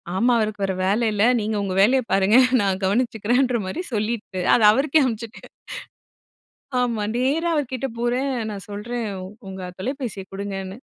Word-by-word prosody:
ஆமா 240 +6 +3
அவருக்கு 215 -2 -2
வர 190 - -1
வேல 210 +5 +1
இல்ல. 205 +1 +1 0.2
நீங்க 215 +1 -2
உங்க 185 -2 -3
வேலைய 255 +6 +4
பாருங்க 195 +5 +4 0.2
நான் 195 -1 0
கவனிச்சுக்கிறேன்ற 240 +3 +1
மாதிரி 190 - -4
சொல்லிட்டு 215 -3 -2
அத - - +4
அவருக்கே 285 +5 +3
அனுப்பிச்சுட்டேன். 230 -2 -5 1.3
ஆமா, 230 -4 -1
நேரா 300 +7 +1
அவர் 280 -4 -1
கிட்ட 270 +1 -2
போறேன். 250 +3 0 0.2
நான் 200 -1 -8
சொல்றேன் 225 +3 -4 0.4
"உங்க 190 0 -7 0.2
தொலைபேசிய 245 -3 -4
குடுங்கன்னு." 195 0 -5
220 Hz, 145 wpm, -22 LUFS, 200-250 Hz, 1.3 s, வேலைய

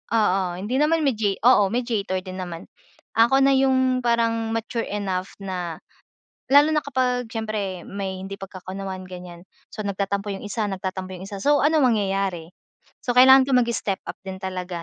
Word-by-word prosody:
oo. 195 -3 +3 0.2
Hindi 215 +7 -3
naman, 315 +1 +2
media 215 -7 +1
oo, 205 -6 +6
mediator 220 -6 -1
din 185 0 -7
naman. 170 -2 -7 0.5
Ako 240 +4 +5
na 275 0 +5
yung 260 -1 +2
parang 230 -1 +1
mature 225 +1 -2
enough 190 -2 -3
na 180 -4 -4 0.7
lalo 290 +2 +6
na 305 - +2
kapag 250 -3 0
siyempre 210 -5 -3
may 195 -1 -5
hindi 195 +1 -6
pagkakaunawaan, 190 0 -7
ganiyan. 180 -1 -10 0.3
So, 215 - -5
nagtatampo 200 +1 -2
yung - - -8
isa 210 +1 -2
nagtatampo 190 0 -5
yung - - -10
isa. 200 -1 -7
So, 290 0 +4
anong 295 -6 +4
mangyayari. 195 -4 -2 0.6
So, 245 - +1
kailangan 265 +1 +8
ko - - -1
mag-step 235 -5 0
up - - -7
din 190 0 -6
talaga 180 -2 -4
205 Hz, 160 wpm, -23 LUFS, 190-250 Hz, 0.7 s, kailangan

